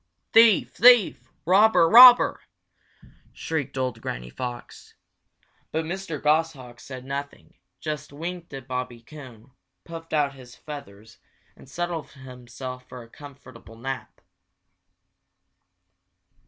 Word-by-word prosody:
"Thief! 225 -3 +5
thief! 245 -3 +4
robber! 190 0 +4
robber!" 245 +5 +8 0.9
shrieked 155 -5 -5
old 130 -1 -3
Granny - - -7
Fox. 120 - -9 0.8
But 160 +1 -2
Mr. 175 -3 -6
Goshawk 150 -5 -1
said 130 -2 -10
nothing, 140 +1 -7 0.3
just 150 -2 -6
winked 170 +4 -7
at 135 -2 -9
Bobby 125 -2 -6
Coon, 130 -4 -14 0.3
puffed 165 -1 -10
out 145 -3 0
his 125 -2 -15
feathers, 115 -8 -12 0.4
and - - -18
settled 175 0 -5
himself 125 -1 -10
for 125 -1 -10
a - - -16
comfortable 130 -6 -14
nap. 135 +4 -7
140 Hz, 105 wpm, -24 LUFS, 125-165 Hz, 0.9 s, robber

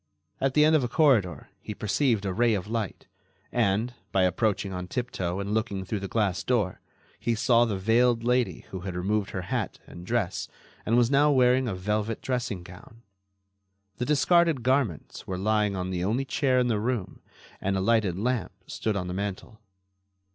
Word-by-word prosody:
At 135 -1 0
the 150 0 +6
end 155 +1 +5
of 150 - +3
a - - 0
corridor 115 - +2
he 105 - -7
perceived 110 0 0
a 95 - -1
ray 115 +1 +3
of 95 - -3
light 110 -2 -4 0.5
and, 115 +1 +1 0.2
by 95 - +3
approaching 95 +1 0
on 90 0 -5
tiptoe 95 -6 -3
and 100 +1 -3
looking 105 -4 -1
through 105 +2 -3
the 100 - -5
glass 100 -4 0
door, 110 -7 0 0.4
he 115 - 0
saw 120 +1 +4
the 105 -4 -2
veiled 115 +4 +2
lady 125 0 0
who 95 - -5
had 90 0 -6
removed 100 +3 -1
her 95 - -4
hat - - -3
and 85 - -11
dress - - -1 0.4
and 115 +2 +3
was 120 +1 +3
now 145 +2 +5
wearing 130 -2 +4
a 105 - -2
velvet 105 +4 -2
dressing 120 -8 -3
gown. 115 +7 -14 0.9
The 125 - -2
discarded 155 -1 +3
garments 130 - -1
were 95 - -3
lying 105 +1 +1
on 90 0 -3
the 90 -1 -2
only 115 +8 0
chair 135 -2 +1
in 125 - +3
the 110 -3 +1
room 110 -4 -3 0.4
and 95 0 0
a - - 0
lighted 100 -3 +2
lamp 120 +1 -1
stood 110 -2 -2
on 90 -2 -2
the 90 - -4
mantel. 100 +3 -5
110 Hz, 185 wpm, -27 LUFS, 95-125 Hz, 0.9 s, the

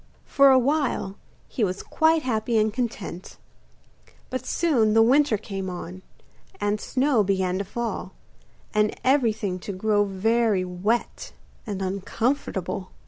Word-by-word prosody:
For 275 0 +5
a 265 - +6
while 260 -7 0 0.3
he 235 - -2
was 185 -1 -2
quite 320 0 +2
happy 230 -2 0
and 215 0 +2
content; 220 -7 -5 0.9
but 255 - -4
soon 235 -11 +2
the 225 - +7
winter 265 -1 +4
came 195 -2 -5
on, 180 +1 -7 0.6
and 205 +1 -1
snow 255 -4 +2
began 190 -1 0
to - - -1
fall, 205 -2 -4 0.6
and 210 0 +1
everything 220 -8 +1
to 200 - -6
grow 205 +2 +1
very 205 0 +1
wet 190 +6 -2 0.3
and 195 -2 -3
uncomfortable. 195 - -2
215 Hz, 130 wpm, -24 LUFS, 190-245 Hz, 0.9 s, the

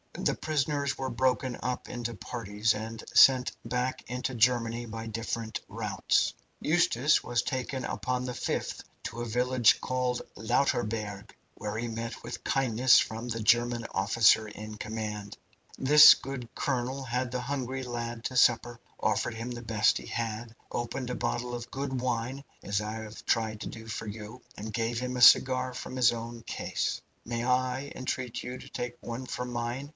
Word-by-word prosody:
The - - 0
prisoners 145 -2 -1
were 135 -1 -2
broken 130 +1 +1
up 125 -1 -2
into 120 -1 -4
parties, 110 -1 -1
and 110 +1 -6
sent 130 -2 +7
back 125 +1 -2
into 125 +1 -3
Germany 120 0 +2
by 115 0 -6
different 115 0 -3
routes. 105 -5 +1 0.3
Eustace 155 -4 +3
was 120 -1 0
taken 130 -1 -3
upon 125 0 -2
the 125 - -3
5th - - -3 0.2
to 120 - -5
a - - -2
village 125 +1 +3
called 125 -1 -1
Lauterburg, 105 -4 -1 0.2
where 105 0 -5
he 120 +1 -2
met 115 0 -5
with - - -7
kindness 130 -1 +4
from 115 +2 -3
the 115 -1 -2
German 120 +1 +3
officer 110 -1 +4
in 105 +1 -8
command. 105 -1 -5 0.4
This 150 +3 +9
good 130 -3 -6
colonel 130 -1 -1
had 125 0 -2
the 125 0 -2
hungry 130 0 -3
lad 120 -1 -4
to 130 - -3
supper, 120 -1 +3 0.2
offered 110 +2 0
him 115 +2 -5
the 120 -1 -6
best 110 -2 +2
he - - -8
had, 115 0 -4 0.2
opened 125 +2 -3
a 125 - -2
bottle 120 0 -2
of 120 -1 -6
good 135 -2 -3
wine, 125 +2 -2 0.2
as 100 +1 0
I 105 +1 -4
have 110 -1 -8
tried 110 -2 0
to - - -4
do 110 0 -9
for 110 0 -5
you, 110 +3 -8 0.2
and 110 +1 -6
gave 115 0 -1
him 125 0 -3
a 125 - -2
cigar 130 0 +6
from 125 - -6
his 125 -2 +5
own 115 0 -6
case. - - -2 0.2
Might 115 0 -3
I 130 +2 0
entreat 130 -2 -3
you 125 +1 -5
to - - -11
take 120 0 -5
one 120 +2 -6
from 125 0 -4
mine?" 120 +4 -3
120 Hz, 170 wpm, -29 LUFS, 115-125 Hz, 0.4 s, This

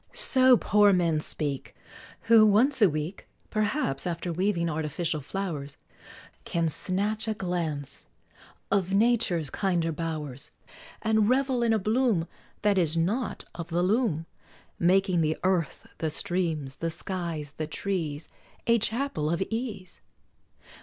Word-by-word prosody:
So 255 -1 +5
poor 205 -1 +4
men 170 -4 +2
speak, 145 -3 -1 0.5
Who, 230 -1 +6
once 230 +6 +4
a 205 - +7
week, 155 +5 -4 0.2
P'rhaps, 210 - -1
after 170 0 -3
weaving 180 -1 0
artificial 160 +1 -2
flowers, 150 -4 -5 0.7
Can 170 -1 0
snatch 205 +7 -2
a 220 - -1
glance 170 -7 -4 0.6
of 195 -1 +1
Nature's 205 - +2
kinder 175 -4 0
bowers, 150 -4 -5 0.5
And 220 -1 +3
revel 260 -1 +2
in 235 -1 +2
a 220 - +4
bloom 215 -4 +1 0.4
That 205 -2 +3
is 165 -2 +1
not 210 +10 -1
of 170 -1 -6
the 175 +1 +1
loom, 190 -5 +1 0.5
Making 185 0 +3
the 155 0 +1
earth, 185 -5 0
the 160 - 0
streams, 160 -5 -2
the 165 - -2
skies, 165 -4 -5
the 155 - -2
trees, 160 -4 -3 0.4
A 235 0 +4
Chapel 220 - -1
of 170 +1 0
Ease. 225 -6 -5
180 Hz, 130 wpm, -27 LUFS, 160-215 Hz, 0.7 s, a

